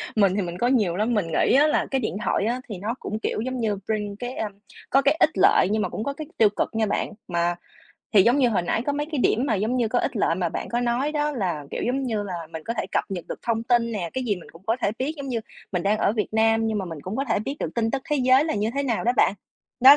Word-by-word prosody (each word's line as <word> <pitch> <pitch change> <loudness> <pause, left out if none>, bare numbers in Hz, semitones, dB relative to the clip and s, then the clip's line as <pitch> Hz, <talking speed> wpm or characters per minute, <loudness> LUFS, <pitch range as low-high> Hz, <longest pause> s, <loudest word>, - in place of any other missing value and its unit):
mình 200 -3 +4
thì 205 - +1
mình 175 -1 -4
có 240 - +1
nhiều 210 -10 +2
lắm, 220 +4 +1
mình 200 -6 +1
nghĩ 165 - +2
á 295 +2 +6
là - - +2
cái 265 -1 +1
điện 215 - -2
thoại 200 - +1
á 245 +3 -1
thì 200 - -5
nó 215 +5 -2
cũng, 215 - -4
kiểu, 215 - -2
giống 255 +1 -3
như, 210 -3 0
bring 210 -2 -2
cái, 245 +1 -4
a, 215 - -2 0.4
có 275 - +4
cái 285 +3 +3
ích - - +6
lợi 185 - +5
nhưng 215 0 +1
mà - - -1
cũng 215 - -4
có 280 - -2
cái 310 0 -7
tiêu 215 -2 +6
cực 205 - -1
nha 220 -1 +2
bạn. - - -1 0.2
Mà 175 0 0 0.6
thì, 200 -3 +7
giống 240 +6 +4
như, 250 -3 +4
hồi 200 -6 +1
nãy 220 +6 0
có 285 - +1
mấy 295 +1 -2
cái 290 - 0
điểm 250 +3 +2
mà, 225 - +1
giống 220 +6 0
như, 235 -3 +1
có 245 - +1
ích 240 - -1
lợi 165 - +2
mà 175 -2 0
bạn - - -5
có 240 +1 0
nói 245 +5 0
đó 295 0 0
là, 175 - -2
kiểu, - - -3
giống 270 +2 0
như 225 -5 -1
là, 200 -3 -5 0.2
mình 160 -1 -6
có 230 - -2
thể - - -2
cập - - +1
nhật 180 -3 -4
được - - -5
thông 225 -1 0
tin 235 -1 +2
nè, 175 -6 -3
cái 260 -1 -2
gì 205 -5 0
mình 175 - -12
cũng 165 +2 -15
có 225 +2 +2
thể 200 - +2
biết, 285 +5 -1
giống 280 -2 -6
như, 235 -3 -1 0.3
mình 180 -2 0
đang 210 +2 +2
ở 205 - +2
Việt 215 -2 -1
Nam 225 0 +3
nhưng 220 -1 0
mà 195 - -2
mình 165 -4 -7
cũng 190 +4 -4
có 275 - 0
thể 225 - +2
biết 270 +7 -4
được 165 - -3
tin 225 -1 +1
tức 270 -1 -2
thế 295 - +3
giới 260 +2 +4
là 320 - -1
như 210 +2 0
thế 280 - 0
nào 240 -5 -1
đó 245 - +3
bạn. 200 - +4 0.5
Đó, 275 +3 +10
225 Hz, 315 wpm, -24 LUFS, 200-255 Hz, 0.6 s, Đó